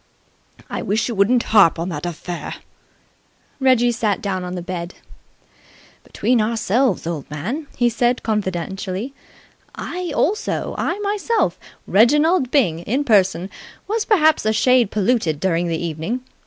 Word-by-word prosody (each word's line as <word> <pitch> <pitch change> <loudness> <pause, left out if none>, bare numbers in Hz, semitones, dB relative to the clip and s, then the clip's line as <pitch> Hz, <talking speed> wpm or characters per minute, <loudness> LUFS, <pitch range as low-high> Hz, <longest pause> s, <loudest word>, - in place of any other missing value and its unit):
"I - - -4
wish 215 +3 0
you 240 - -3
wouldn't 230 +4 +3
harp 195 -7 +6
on 170 +2 -3
that 165 0 -4
affair!" 175 +1 -6 1.0
Reggie 255 -3 +4
sat 220 -4 0
down 190 -2 -3
on 180 0 -5
the 175 - -5
bed. 175 0 -5 1.1
"Between 245 -2 0
ourselves, 230 +2 +1
old 165 -4 -4
man," 220 - -4
he 240 - +3
said 240 +1 +1
confidentially, 195 +2 -3 0.6
"I 360 -1 -5
also 420 +5 0
I - - -1
myself 415 +3 0 0.3
Reginald 295 - +3
Byng, 220 - +2
in 250 +11 -1
person 190 -6 +2 0.4
was 435 +1 -1
perhaps 315 -8 +3
a 215 - +1
shade 245 0 +3
polluted 205 - 0
during 175 -1 0
the 165 -1 -1
evening. 170 +9 -3
215 Hz, 135 wpm, -20 LUFS, 180-255 Hz, 1.1 s, harp